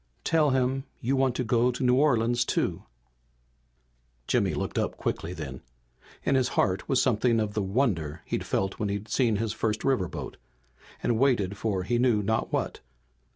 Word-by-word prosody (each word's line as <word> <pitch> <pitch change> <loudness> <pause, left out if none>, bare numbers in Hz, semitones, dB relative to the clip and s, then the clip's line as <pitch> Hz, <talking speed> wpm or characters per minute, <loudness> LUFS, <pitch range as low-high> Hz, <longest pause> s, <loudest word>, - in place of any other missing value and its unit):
Tell 160 -2 +3
him 130 +1 0
you 130 +4 0
want 130 -2 +2
to 125 - -1
go 120 +1 +2
to 125 - -4
New 125 0 +4
Orleans, 120 -4 +3
too!" - - -1 1.4
Jimmy - - +1
looked - - -2
up - - -2
quickly 80 - -3
then. 75 -7 -7 0.6
In - - +1
his 130 -2 +3
heart 95 +1 +1
was 130 - +3
something 120 -2 +2
of 105 -1 -1
the 105 - 0
wonder 95 - -1
he'd - - -2
felt 95 0 -1
when 105 - -1
he'd 100 +2 -4
seen 120 -5 +2
his 110 +1 -1
first 110 -1 -1
riverboat 125 -11 -1 0.7
and 115 -2 +1
waited 115 -8 +2
for 100 -3 -1
he 120 +5 0
knew 120 -4 +3
not 110 +3 0
what. - - -2
115 Hz, 170 wpm, -27 LUFS, 100-130 Hz, 1.4 s, New